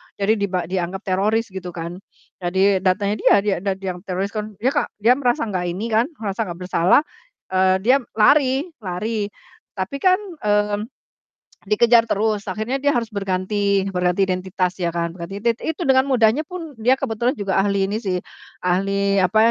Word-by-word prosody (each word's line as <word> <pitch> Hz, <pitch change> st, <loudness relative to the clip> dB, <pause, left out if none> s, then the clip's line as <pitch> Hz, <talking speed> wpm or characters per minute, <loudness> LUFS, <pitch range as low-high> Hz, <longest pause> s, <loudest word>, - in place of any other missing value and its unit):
jadi 205 Hz, +2 st, +2 dB
diba 185 Hz, -3 st, -1 dB
dianggap 190 Hz, +1 st, -2 dB
teroris 210 Hz, +3 st, 0 dB
gitu 180 Hz, -2 st, -7 dB
kan, 170 Hz, +1 st, -6 dB, 0.4 s
jadi 190 Hz, +2 st, +2 dB
datanya 200 Hz, +2 st, +1 dB
dia -, -, +5 dB
dia 205 Hz, -2 st, +1 dB
dan 195 Hz, 0 st, -1 dB
dia 190 Hz, -1 st, -4 dB
yang 180 Hz, -, -9 dB
teroris 190 Hz, +2 st, -2 dB
kan 215 Hz, -1 st, -5 dB
dia 250 Hz, +8 st, 0 dB
ka -, -, 0 dB, 0.2 s
dia 250 Hz, +4 st, +5 dB
merasa 250 Hz, +1 st, +1 dB
nggak 180 Hz, -1 st, -2 dB
ini 185 Hz, +6 st, -3 dB
kan 225 Hz, +4 st, +3 dB
merasa 215 Hz, 0 st, -3 dB
gak 175 Hz, 0 st, -7 dB
bersalah, 180 Hz, -, +3 dB, 0.5 s
eee, 185 Hz, 0 st, +3 dB
dia 255 Hz, +5 st, +5 dB, 0.2 s
lari 265 Hz, +4 st, +4 dB, 0.2 s
lari 205 Hz, +2 st, -3 dB, 0.5 s
tapi 195 Hz, +8 st, -3 dB
kan, 370 Hz, +4 st, +5 dB, 0.3 s
mmm, 210 Hz, 0 st, +1 dB, 0.9 s
dikejar 230 Hz, +2 st, +4 dB
terus 210 Hz, 0 st, 0 dB
akhirnya 220 Hz, +8 st, -2 dB
dia 285 Hz, 0 st, +1 dB
harus 230 Hz, -2 st, -1 dB
berganti 200 Hz, 0 st, 0 dB
berganti 180 Hz, +1 st, +1 dB
identitas 185 Hz, 0 st, -1 dB
ya 170 Hz, -1 st, -2 dB
kan 170 Hz, 0 st, -1 dB
gatidet 195 Hz, +7 st, -3 dB
itu 320 Hz, +2 st, -3 dB
dengan 265 Hz, -2 st, +3 dB
mudahnya 255 Hz, +3 st, +2 dB
pun 335 Hz, -4 st, -7 dB
dia 250 Hz, +4 st, +4 dB
kebetulan 245 Hz, 0 st, -1 dB
juga 195 Hz, -4 st, 0 dB
ahli 200 Hz, 0 st, +1 dB
ini 210 Hz, +2 st, -2 dB
sih, 190 Hz, -5 st, -2 dB, 0.5 s
ahli 195 Hz, +2 st, +1 dB
apa 190 Hz, +3 st, +2 dB
200 Hz, 170 wpm, -21 LUFS, 185-230 Hz, 0.9 s, dia